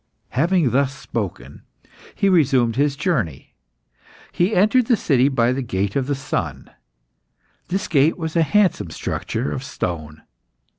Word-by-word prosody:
Having 165 0 +2
thus 135 +2 +1
spoken, 105 -6 -5 0.5
he 200 - +1
resumed 130 - +3
his 140 +1 +1
journey. 135 - -2 0.8
He 180 +5 +1
entered 215 +6 +3
the 240 - +3
city 135 -5 +2
by 120 -3 +2
the 135 - -2
Gate 100 -4 -2
of 135 -1 0
the 145 - 0
Sun. 135 0 -4 1.0
This 190 +2 -2
gate 150 +1 +3
was 160 -2 -4
a 165 - +4
handsome 195 +4 +2
structure 115 +4 -3
of 130 - -3
stone. 80 - -5
140 Hz, 140 wpm, -21 LUFS, 120-175 Hz, 1.0 s, a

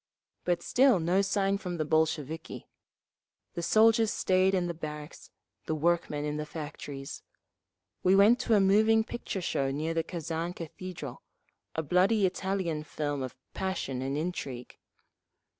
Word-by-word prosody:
But 175 -1 0
still 260 -6 +4
no 175 +4 +2
sign 195 0 +1
from 180 -3 -4
the 155 - -1
Bolsheviki; 160 0 -1 0.9
the 170 - -3
soldiers 220 +3 +4
stayed 185 +1 +2
in 180 -2 +1
the 175 - -2
barracks, 150 -1 -8 0.4
the 155 - 0
workmen 155 -2 0
in 150 0 -2
the 150 - -3
factories…. 145 -3 -7 0.8
We 185 +1 +4
went 210 +5 +6
to 225 - +2
a - - +5
moving 215 +3 +4
picture 220 -4 -5
show 135 -5 0
near 155 +4 -2
the 165 - +1
Kazan 165 0 -4
Cathedral—a 160 -2 -8
bloody 190 +7 +3
Italian 185 -4 -1
film 145 -1 -3
of 130 -1 -5 0.2
passion 185 -9 -3
and 135 +2 -2
intrigue. 140 -7 -4
170 Hz, 140 wpm, -29 LUFS, 150-195 Hz, 0.9 s, went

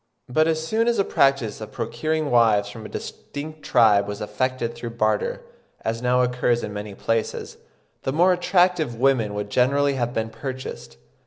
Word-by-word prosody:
But 155 +6 +2
as 160 -1 0
soon 225 +6 +1
as 235 -1 +2
the 200 - +3
practice 135 - +1
of 110 - -7
procuring 155 +6 -2
wives 110 -4 +4
from 110 -1 -8
a - - -14
distinct 155 +2 -7
tribe 105 -6 +4
was 105 0 -5
effected 115 +3 -2
through 120 0 -7
barter, 110 -2 0 0.4
as 115 +1 -2
now 125 0 +3
occurs 125 -1 +1
in 105 - -5
many 105 -1 -6
places, 115 +2 -2 0.4
the 135 - -2
more 175 +6 +4
attractive 180 -6 +2
women 115 -4 +2
would 105 0 -4
generally 140 +3 +3
have 120 -3 -1
been 115 -2 -2
purchased. 130 - -7
125 Hz, 170 wpm, -23 LUFS, 110-145 Hz, 0.4 s, wives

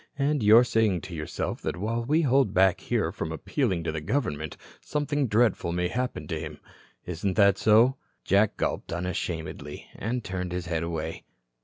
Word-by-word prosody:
And 145 0 +1
you're 110 +3 +7
saying 110 -7 +1
to 90 - -9
yourself 75 -1 -4
that - - -3
while 115 +5 -2
we 155 +7 +2
hold 135 -6 +3
back 95 -1 +4
here - - 0
from 80 - -4
appealing 95 - -1
to 80 - -1
the 80 -1 -4
government, 75 - -2 0.2
something 145 -2 -1
dreadful 110 -5 +2
may 90 0 0
happen 125 +3 -3
to 80 -3 -2
him. 75 -2 -7 0.5
Isn't 90 +2 -2
that 100 -2 +4
so?" 115 +5 +5 0.3
Jack 100 +2 +2
gulped - - -2
unashamedly, 85 -4 -4
and 120 +3 -3
turned 90 -2 -4
his 90 -1 -3
head 80 -1 -1
away. 80 -1 -4
95 Hz, 170 wpm, -27 LUFS, 85-120 Hz, 0.5 s, you're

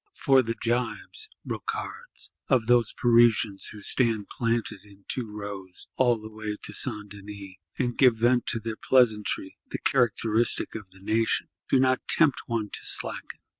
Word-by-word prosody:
For 135 -1 +4
the 115 -2 -3
jibes 125 - -2 0.2
(brocards) 455 +4 -5 0.2
of 125 -4 +2
those 120 -2 +3
Parisians, 115 -4 +3
who 105 - -9
stand 110 -2 +1
planted 115 -3 -1
in 100 -1 -19
two 125 -3 -3
rows, 100 -3 -8
all 120 -3 +3
the 110 0 -10
way 110 -1 -5
to - - -4
St. 105 0 0
Denis, 100 -1 -10 0.2
and 120 -2 -1
"give 125 -4 +6
vent 120 +2 +2
to 115 - 0
their 110 0 -5
pleasantry, 110 -6 +1
the - - -3
characteristic 115 -2 +2
of 105 -4 -8
the 95 0 -19
nation," 110 +3 0 0.2
do 135 - +4
not 130 0 +1
tempt 150 -5 +4
one 110 -3 -2
to - - -1
slacken. - - 0
115 Hz, 160 wpm, -26 LUFS, 105-125 Hz, 0.2 s, give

